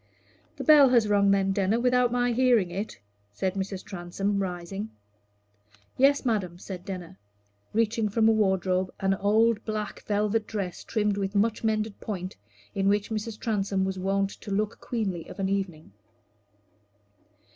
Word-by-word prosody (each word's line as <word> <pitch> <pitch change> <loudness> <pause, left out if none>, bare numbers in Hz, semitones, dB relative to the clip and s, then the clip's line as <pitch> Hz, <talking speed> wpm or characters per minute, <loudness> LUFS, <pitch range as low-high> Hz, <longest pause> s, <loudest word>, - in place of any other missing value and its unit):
"The - - -5
bell 295 -3 +7
has 235 -4 +4
rung, 200 -1 +3
then, 195 -1 +3
Denner, 195 +3 +1
without 250 0 +3
my 245 0 +1
hearing 235 -7 +3
it?" 195 - -5 0.3
said 185 - -2
Mrs. 195 -1 -4
Transome, 195 +2 -2
rising. 190 +3 -4 1.1
"Yes, 275 +1 +4
madam," 195 -7 -1
said 180 -1 -8
Denner, 180 - -7 0.5
reaching 225 0 +1
from 220 +2 +3
a - - +6
wardrobe 190 -3 +1
an 195 0 +2
old 220 +3 +2
black 215 -1 -4
velvet 210 +1 +1
dress 195 -5 -4
trimmed 210 -2 0
with 195 0 -2
much 220 +3 +1
mended 215 -1 -1
point, 185 -3 -5 0.4
in 195 0 +1
which 205 +2 +1
Mrs. 215 0 -4
Transome 195 -3 0
was 190 0 -3
wont 195 +1 0
to - - -11
look 210 +2 -1
queenly 195 -8 -3
of - - -10
an 190 0 0
evening. 185 - -3
200 Hz, 150 wpm, -27 LUFS, 190-220 Hz, 1.1 s, bell